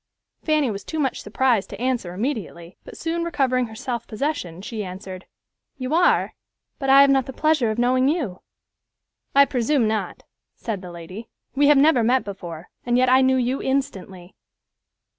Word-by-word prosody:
Fanny 305 Hz, -6 st, +1 dB
was 200 Hz, -1 st, -6 dB
too 315 Hz, -, -6 dB
much 275 Hz, -4 st, -1 dB
surprised 225 Hz, 0 st, 0 dB
to -, -, -9 dB
answer 245 Hz, -7 st, -1 dB
immediately, 195 Hz, -, -4 dB
but -, -, -12 dB
soon 335 Hz, +1 st, -2 dB
recovering 255 Hz, -7 st, 0 dB
her 220 Hz, -, -11 dB
self 235 Hz, +1 st, -4 dB
possession, 215 Hz, -, -3 dB
she 215 Hz, 0 st, -5 dB
answered, 185 Hz, 0 st, -8 dB, 0.5 s
"You 255 Hz, +2 st, -4 dB
are, 350 Hz, +2 st, +3 dB, 0.5 s
but 270 Hz, -2 st, -2 dB
I 275 Hz, +1 st, +8 dB
have 280 Hz, 0 st, +6 dB
not 270 Hz, -2 st, +2 dB
the 265 Hz, -, -6 dB
pleasure 305 Hz, -5 st, +2 dB
of 215 Hz, -, -2 dB
knowing 255 Hz, +2 st, +2 dB
you." 275 Hz, -, -2 dB, 0.9 s
"I 280 Hz, 0 st, +7 dB
presume 255 Hz, -1 st, +1 dB
not," 215 Hz, -4 st, -3 dB, 0.3 s
said 215 Hz, -5 st, -5 dB
the 180 Hz, -, -9 dB
lady. 175 Hz, +6 st, -9 dB, 0.2 s
"We 285 Hz, +1 st, +3 dB
have 295 Hz, -1 st, +6 dB
never 275 Hz, -3 st, +5 dB
met 250 Hz, +3 st, +2 dB
before, 175 Hz, -4 st, -8 dB
and 240 Hz, 0 st, +1 dB
yet 255 Hz, 0 st, +3 dB
I 260 Hz, +1 st, +5 dB
knew 260 Hz, 0 st, +3 dB
you 255 Hz, +2 st, -1 dB
instantly." 195 Hz, -9 st, -3 dB
250 Hz, 175 wpm, -23 LUFS, 200-275 Hz, 0.9 s, I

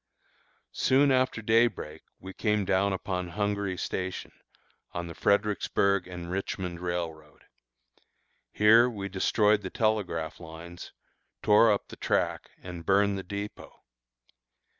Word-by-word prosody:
Soon 140 Hz, +2 st, +3 dB
after 130 Hz, -3 st, +1 dB
day 115 Hz, +2 st, +5 dB
break 80 Hz, -8 st, -8 dB, 0.2 s
we 95 Hz, +1 st, -9 dB
came 105 Hz, -2 st, 0 dB
down 100 Hz, +1 st, +2 dB
upon 90 Hz, -1 st, -3 dB
Hungary 100 Hz, 0 st, -2 dB
Station, 95 Hz, 0 st, -4 dB, 0.6 s
on 85 Hz, 0 st, -3 dB
the 85 Hz, -, -7 dB
Fredericksburg 100 Hz, -1 st, +1 dB
and 90 Hz, -1 st, -7 dB
Richmond 90 Hz, -2 st, -3 dB
Railroad. 85 Hz, -4 st, -5 dB, 1.1 s
Here 115 Hz, +4 st, +6 dB
we 100 Hz, -4 st, -5 dB
destroyed 105 Hz, +2 st, +2 dB
the 95 Hz, -, -5 dB
telegraph 95 Hz, -9 st, -1 dB
lines, 85 Hz, +1 st, -10 dB, 0.5 s
tore 105 Hz, +2 st, +6 dB
up 100 Hz, -, -1 dB
the -, -, -10 dB
track, -, -, -1 dB
and 90 Hz, -2 st, -7 dB
burned 100 Hz, +3 st, +3 dB
the 95 Hz, -, -5 dB
dépôt. 100 Hz, +2 st, -7 dB
100 Hz, 120 wpm, -28 LUFS, 90-105 Hz, 1.1 s, Here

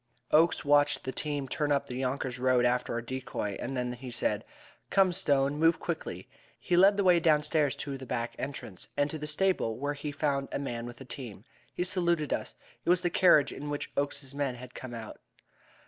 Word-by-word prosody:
Oakes 160 Hz, +1 st, +4 dB
watched 145 Hz, 0 st, +4 dB
the 130 Hz, -, -3 dB
team 145 Hz, -1 st, -2 dB
turn 145 Hz, +3 st, -1 dB
up 140 Hz, -1 st, +2 dB
the 125 Hz, -3 st, -6 dB
Yonkers 130 Hz, -1 st, -2 dB
Road 125 Hz, -1 st, +3 dB
after 125 Hz, 0 st, +1 dB
our 120 Hz, 0 st, -2 dB
decoy, 120 Hz, -5 st, -4 dB
and 130 Hz, +2 st, -3 dB
then 125 Hz, 0 st, -1 dB
he 125 Hz, +1 st, -8 dB
said: 115 Hz, -3 st, -1 dB, 0.5 s
"Come, 190 Hz, -2 st, +4 dB
Stone, 145 Hz, -5 st, +2 dB
move 165 Hz, +1 st, +4 dB
quickly." -, -, -4 dB, 0.3 s
He 175 Hz, -, 0 dB
led 195 Hz, +3 st, +6 dB
the 200 Hz, -, +2 dB
way 180 Hz, -2 st, +6 dB
downstairs 150 Hz, -2 st, +3 dB
to 140 Hz, -2 st, -5 dB
the 130 Hz, -, -9 dB
back 120 Hz, -1 st, -2 dB
entrance, 120 Hz, -8 st, -6 dB
and 145 Hz, 0 st, +2 dB
to 155 Hz, -, -5 dB
the 150 Hz, -, -4 dB
stable, 150 Hz, -8 st, +1 dB
where 145 Hz, +3 st, -2 dB
we 150 Hz, -, -2 dB
found 140 Hz, -2 st, -1 dB
a -, -, -1 dB
man 120 Hz, -4 st, -4 dB
with 120 Hz, 0 st, -10 dB
a -, -, -8 dB
team. 120 Hz, -5 st, -7 dB, 0.3 s
He 180 Hz, -, -2 dB
saluted 170 Hz, -4 st, 0 dB
us. -, -, -4 dB, 0.3 s
It -, -, -2 dB
was 180 Hz, 0 st, +4 dB
the 175 Hz, -1 st, 0 dB
carriage 165 Hz, -7 st, +5 dB
in 145 Hz, +1 st, -6 dB
which 145 Hz, 0 st, -4 dB
Oakes's 140 Hz, -1 st, -2 dB
men 140 Hz, -3 st, -1 dB
had 125 Hz, 0 st, -11 dB
come 125 Hz, -2 st, -7 dB
out. 110 Hz, -2 st, -8 dB
140 Hz, 210 wpm, -30 LUFS, 125-155 Hz, 0.5 s, led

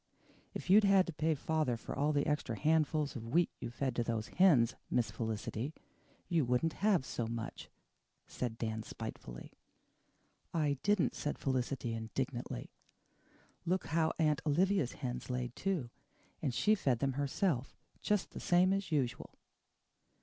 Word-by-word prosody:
"If -, -, -5 dB
you'd 210 Hz, +2 st, +8 dB
had 195 Hz, -2 st, +5 dB
to 170 Hz, -, -5 dB
pay 160 Hz, +1 st, +1 dB
father 150 Hz, -4 st, 0 dB
for -, -, -6 dB
all 145 Hz, +3 st, +2 dB
the 145 Hz, -1 st, +1 dB
extra 150 Hz, -7 st, -1 dB
handfuls 155 Hz, 0 st, +2 dB
of 115 Hz, -2 st, -6 dB
wheat 170 Hz, +8 st, +2 dB
you've 120 Hz, 0 st, -6 dB
fed 130 Hz, -2 st, -1 dB
to 120 Hz, -, +2 dB
those 115 Hz, -1 st, -2 dB
hens, 145 Hz, -11 st, +5 dB, 0.2 s
Miss 115 Hz, -3 st, +1 dB
Felicity, 110 Hz, +5 st, -3 dB, 0.5 s
you 165 Hz, -3 st, +2 dB
wouldn't 125 Hz, +6 st, +1 dB
have 195 Hz, -9 st, +3 dB
so 120 Hz, -2 st, -3 dB
much," 115 Hz, -1 st, -5 dB, 0.6 s
said 120 Hz, -3 st, -4 dB
Dan 110 Hz, -1 st, -2 dB
spitefully. -, -, -8 dB, 1.0 s
"I 145 Hz, -4 st, +1 dB
didn't," 205 Hz, -3 st, +2 dB
said 150 Hz, -, -3 dB
Felicity 130 Hz, -2 st, -1 dB
indignantly. 120 Hz, +2 st, -4 dB, 0.9 s
"Look 185 Hz, +2 st, 0 dB
how 160 Hz, -1 st, +3 dB
Aunt 155 Hz, -3 st, +2 dB
Olivia's 165 Hz, -1 st, +2 dB
hens 125 Hz, -2 st, -5 dB
laid, 125 Hz, -1 st, -3 dB
too, 175 Hz, -11 st, -1 dB, 0.5 s
and 140 Hz, -, 0 dB
she 210 Hz, -, +3 dB
fed 135 Hz, -, +2 dB
them 135 Hz, +2 st, 0 dB
herself 140 Hz, 0 st, 0 dB, 0.3 s
just 210 Hz, -2 st, 0 dB
the -, -, -7 dB
same 180 Hz, +2 st, +4 dB
as 195 Hz, -3 st, -2 dB
usual." 135 Hz, -6 st, -1 dB
140 Hz, 150 wpm, -34 LUFS, 120-165 Hz, 1.0 s, you'd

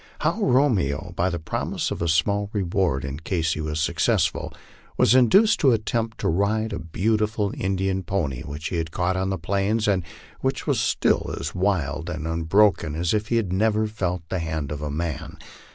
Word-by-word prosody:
How 170 Hz, +8 st, 0 dB
Romeo, 95 Hz, -, +2 dB
by 90 Hz, +2 st, +1 dB
the 85 Hz, -, -2 dB
promise 80 Hz, -, -3 dB
of -, -, -4 dB
a 85 Hz, -, 0 dB
small 100 Hz, +5 st, +1 dB
reward 90 Hz, -8 st, 0 dB
in 70 Hz, +2 st, -5 dB
case 80 Hz, -1 st, -1 dB
he 75 Hz, -, -4 dB
was 75 Hz, 0 st, -3 dB
successful, 80 Hz, -, +1 dB, 0.5 s
was -, -, +5 dB
induced 190 Hz, -, +5 dB
to 135 Hz, -4 st, +5 dB
attempt 115 Hz, 0 st, -1 dB
to -, -, 0 dB
ride 100 Hz, +5 st, +1 dB
a -, -, -3 dB
beautiful 105 Hz, +4 st, 0 dB
Indian 95 Hz, 0 st, -1 dB
pony, 80 Hz, -10 st, -2 dB
which 75 Hz, +3 st, -6 dB
we 90 Hz, -, -1 dB
had 80 Hz, -1 st, -2 dB
caught 90 Hz, +3 st, -1 dB
on 95 Hz, +1 st, -1 dB
the 95 Hz, -, -1 dB
plains, 100 Hz, +5 st, 0 dB
and 95 Hz, -3 st, +2 dB, 0.4 s
which -, -, -2 dB
was -, -, +1 dB
still -, -, +1 dB
as 75 Hz, +3 st, -4 dB
wild 85 Hz, -5 st, -1 dB
and 80 Hz, -2 st, -4 dB
unbroken 80 Hz, 0 st, +2 dB
as 85 Hz, +3 st, 0 dB
if 105 Hz, 0 st, 0 dB
he 120 Hz, -, 0 dB
had 105 Hz, -6 st, 0 dB
never 110 Hz, +2 st, +2 dB
felt 90 Hz, -5 st, -3 dB
the 95 Hz, -, -1 dB
hand 80 Hz, -3 st, -3 dB
of 75 Hz, -1 st, -4 dB
man. 80 Hz, -1 st, -4 dB
95 Hz, 185 wpm, -24 LUFS, 80-105 Hz, 0.5 s, was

